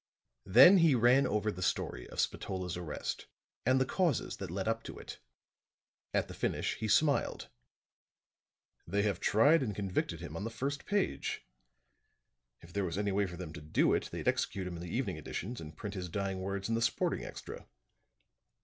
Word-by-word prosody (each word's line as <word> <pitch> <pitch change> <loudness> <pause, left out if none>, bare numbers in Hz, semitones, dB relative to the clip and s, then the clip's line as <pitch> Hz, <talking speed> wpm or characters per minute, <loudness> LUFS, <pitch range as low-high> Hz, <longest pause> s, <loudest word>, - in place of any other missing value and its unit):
Then 180 - +9
he 165 -5 +5
ran 125 +4 +5
over 105 +1 0
the 90 - -8
story - - -2
of - - -7
Spatola's 90 -2 -2
arrest 85 -4 -4 0.4
and 130 +1 +5
the 130 - +3
causes 170 -1 0
that - - -6
led 95 +4 -3
up 115 0 0
to - - -7
it. - - -9 0.9
At - - +1
the - - -8
finish - - -1
he 110 - -2
smiled. 145 +6 +2 1.4
"They 100 +4 +1
have 100 -4 0
tried 145 +10 +5
and 105 -6 -2
convicted 95 -4 -2
him 85 -2 -7
on 85 - -4
the 115 - -2
first 140 +5 -4
page. 205 -1 -1 1.2
If 85 +1 -15
there 100 - 0
was 85 -1 -3
any 100 0 0
way 100 0 +1
for 90 -1 -8
them 85 -3 -7
to 75 - -8
do 75 +1 +2
it, - - 0
they'd - - -5
execute 95 -2 0
him 90 -1 -5
in - - -8
the 90 - -6
evening - - -2
editions 115 +3 -5
and 80 0 -10
print 100 +2 -5
his 90 -3 -5
dying 95 +1 -2
words 100 +1 -3
in 115 - -1
the 115 - +1
sporting 115 - 0
extra. - - -8
100 Hz, 185 wpm, -32 LUFS, 90-120 Hz, 1.4 s, Then